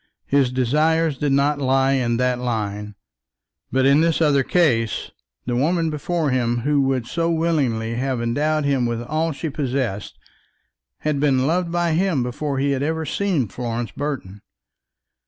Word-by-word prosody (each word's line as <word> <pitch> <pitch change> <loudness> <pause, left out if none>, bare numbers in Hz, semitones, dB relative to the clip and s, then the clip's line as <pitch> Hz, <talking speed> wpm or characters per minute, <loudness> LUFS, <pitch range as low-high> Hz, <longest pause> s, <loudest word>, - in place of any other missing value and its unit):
His 135 -3 +2
desires 150 +5 +1
did 145 -1 0
not 140 +1 +2
lie 135 0 +2
in 120 -3 +1
that 125 0 +1
line. 105 -4 -3 0.8
But 130 0 +2
in 140 +3 +5
this 165 -1 +2
other 145 -4 +3
case, 120 -8 +1 0.3
the 120 - -1
woman 165 +5 +1
before 155 0 -1
him 120 -2 0
who 145 +2 +2
would 135 -3 0
so 165 +6 -1
willingly 145 -9 0
have 130 +1 -1
endowed 145 +6 0
him 135 -4 +1
with 120 0 -3
all 155 +6 -1
that 160 - -3
she 160 +1 -4
possessed, 130 -8 -3 0.8
had 150 -2 0
been 135 -3 +2
loved 170 +3 0
by 175 -1 +1
him 165 -5 +1
before 135 +3 -3
he 140 +1 +1
had 135 -1 -1
ever 160 +2 -1
seen 165 - 0
Florence 115 +1 -4
Burton. 120 -6 -5
135 Hz, 160 wpm, -22 LUFS, 120-155 Hz, 0.8 s, in